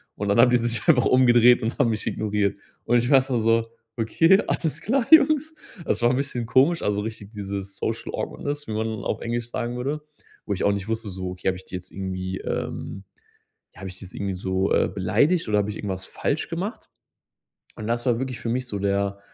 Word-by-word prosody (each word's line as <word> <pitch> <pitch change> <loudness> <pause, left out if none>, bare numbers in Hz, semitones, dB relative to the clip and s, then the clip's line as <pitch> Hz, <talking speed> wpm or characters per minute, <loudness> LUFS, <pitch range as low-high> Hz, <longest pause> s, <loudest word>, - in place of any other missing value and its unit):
Und 100 - -3
dann 100 - +3
haben 125 +1 +7
die 125 - +5
sich 120 +5 -2
einfach 130 -8 +5
umgedreht 120 -2 +5
und 115 - -2
haben 115 - +4
mich 110 - -3
ignoriert. 105 -2 0 0.3
Und 120 - +3
ich 120 +2 -1
war 140 - +6
erstmal 130 -2 +1
so: 115 0 +2 0.3
„Okay, 165 - +4
alles 160 -3 -1
klar, 250 +2 0
Jungs.“ 315 -1 +6 0.3
Das - - 0
war 120 - +5
'n 125 - +1
bisschen 130 -4 -2
komisch, 140 +8 +3
also 105 0 0
richtig 110 -1 -7
dieses 100 -2 -6
social 115 0 -3
Awkwardness, 145 -1 -4
wie 110 - -4
man 110 +1 -1 0.2
auf - - -2
Englisch 120 0 -3
sagen 120 0 -3
würde. 145 +4 -2 0.4
Wo 100 - -1
ich 95 - -3
auch 100 - +4
nicht 100 +1 -4
wusste, 110 -2 -2
so: 95 -1 -4
„Okay, 90 +1 -6
habe 95 -1 +1
ich 95 - -12
die - - -8
jetzt 90 -1 -8
irgendwie, 95 -1 -4
ähm 95 - -4 0.7
habe 95 +1 -8
ich 95 - -8
die - - -9
jetzt 90 - -12
irgendwie 100 -1 -2
so, 95 +1 0
äh, - - +3
beleidigt 145 - +2
oder 105 -1 +2
habe 105 +1 -1
ich 105 - -8
irgendwas 95 -2 -4
falsch 145 - -2
gemacht?“ 185 +8 -5 0.9
Und 110 - -7
das 120 +1 -1
war 120 -3 +2
wirklich 130 -2 -4
für 115 - -4
mich 125 +2 -1
so 100 -5 -4
der, 100 0 0
115 Hz, 220 wpm, -24 LUFS, 100-130 Hz, 0.9 s, haben